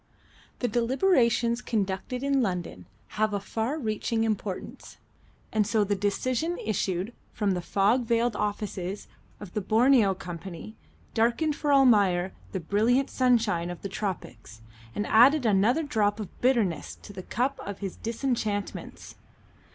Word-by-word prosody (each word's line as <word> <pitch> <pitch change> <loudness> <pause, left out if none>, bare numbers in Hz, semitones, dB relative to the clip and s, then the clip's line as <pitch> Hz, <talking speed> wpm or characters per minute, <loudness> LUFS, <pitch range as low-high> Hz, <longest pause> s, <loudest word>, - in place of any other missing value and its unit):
The 245 - +2
deliberations 235 - +2
conducted 210 +4 -2
in 275 -1 +2
London 180 -6 -3 0.3
have 215 -1 +2
a - - 0
far 225 +8 -2
reaching 225 -3 -1
importance, 210 -4 -4 0.6
and 215 -2 +2
so 220 -1 +2
the 205 0 0
decision 255 - -1
issued 200 0 -2 0.2
from 205 -2 0
the 180 -1 -1
fog 205 +7 +2
veiled 230 0 +1
offices 205 -2 -3 0.3
of 205 -4 -10
the 210 - -1
Borneo 220 -1 +4
Company 180 +4 -8 0.4
darkened 240 +7 +1
for 295 -1 -1
Almayer 200 -9 +4 0.2
the 190 - -2
brilliant 225 - +1
sunshine 230 -9 +2
of 175 - -8
the 200 - -3
Tropics, 125 - -6 0.3
and 210 - -1
added 255 +6 +5
another 220 +8 +3
drop 215 -7 0
of 210 - -8
bitterness 225 - +1
to 205 - -13
the 190 - -7
cup 255 +8 -2
of 200 -1 -6
his 195 -3 -5
disenchantments. 225 -3 -3
215 Hz, 135 wpm, -27 LUFS, 195-245 Hz, 0.6 s, added